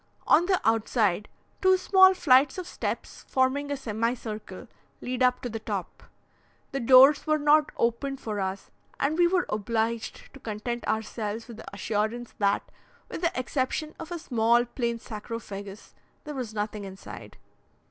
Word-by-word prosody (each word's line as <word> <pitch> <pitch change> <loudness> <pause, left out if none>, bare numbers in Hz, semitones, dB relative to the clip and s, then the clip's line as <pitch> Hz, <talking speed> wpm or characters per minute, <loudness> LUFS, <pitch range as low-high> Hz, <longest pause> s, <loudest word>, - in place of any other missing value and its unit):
On 345 +3 +5
the 375 -2 +3
outside, 215 -3 +1 0.3
two 375 0 +5
small 375 0 +6
flights 265 -3 +4
of 370 - -4
steps, - - -5
forming 270 +2 +1
a 285 - -2
semicircle, 220 -2 -4 0.3
lead 255 0 -4
up 250 0 +3
to 250 - -3
the 225 0 -5
top. 205 -4 -5 0.7
The 275 - -2
doors 265 +5 +7
were 310 0 +3
not 300 +1 +4
opened 265 +4 -1
for 215 -4 -4
us, 190 0 -4 0.3
and 280 +3 +1
we 350 +1 +4
were 360 0 +1
obliged 225 +1 -2
to 275 - -12
content 235 +1 -4
ourselves 220 0 -3
with 235 -3 -10
the - - -10
assurance 220 +3 -2
that, 200 -1 +2 0.5
with - - -6
the 335 -6 0
exception 260 +4 -2
of 325 +1 -8
a 345 - -2
small, 240 -4 +2
plain 235 -1 -2
sarcophagus 210 -3 -8 0.3
there 300 - -6
was 250 -5 -4
nothing 210 0 -3
inside. 195 0 -10
240 Hz, 155 wpm, -27 LUFS, 215-285 Hz, 0.7 s, doors